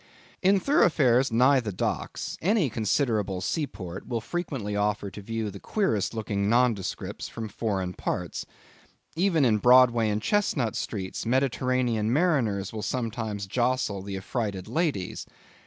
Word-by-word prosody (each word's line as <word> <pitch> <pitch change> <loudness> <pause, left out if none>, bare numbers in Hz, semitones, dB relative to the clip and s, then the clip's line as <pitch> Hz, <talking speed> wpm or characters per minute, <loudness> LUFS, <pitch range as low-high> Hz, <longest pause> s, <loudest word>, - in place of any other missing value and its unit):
In 195 +1 +4
thoroughfares 135 - +3
nigh 130 +4 +5
the 110 -4 -3
docks, 90 - -3
any 185 - +2
considerable 105 -3 0
seaport 95 - -4
will 120 -2 -1
frequently 120 - -4
offer 105 -1 -1
to 105 - -9
view 110 0 -3
the 100 - -9
queerest 115 - 0
looking 100 -2 -1
nondescripts 115 -5 0
from 115 -1 -5
foreign 100 -4 -2
parts. 90 -1 -3 0.7
Even 165 -4 +3
in 110 -3 +3
Broadway 120 -2 +5
and 105 0 0
Chestnut 140 - 0
streets, 95 -4 -4
Mediterranean 125 -3 +1
mariners 120 - +1
will 110 - -4
sometimes 110 -4 -3
jostle 120 -2 0
the 100 0 -5
affrighted 100 -1 -3
ladies. 150 - -2
115 Hz, 130 wpm, -27 LUFS, 100-130 Hz, 0.7 s, nigh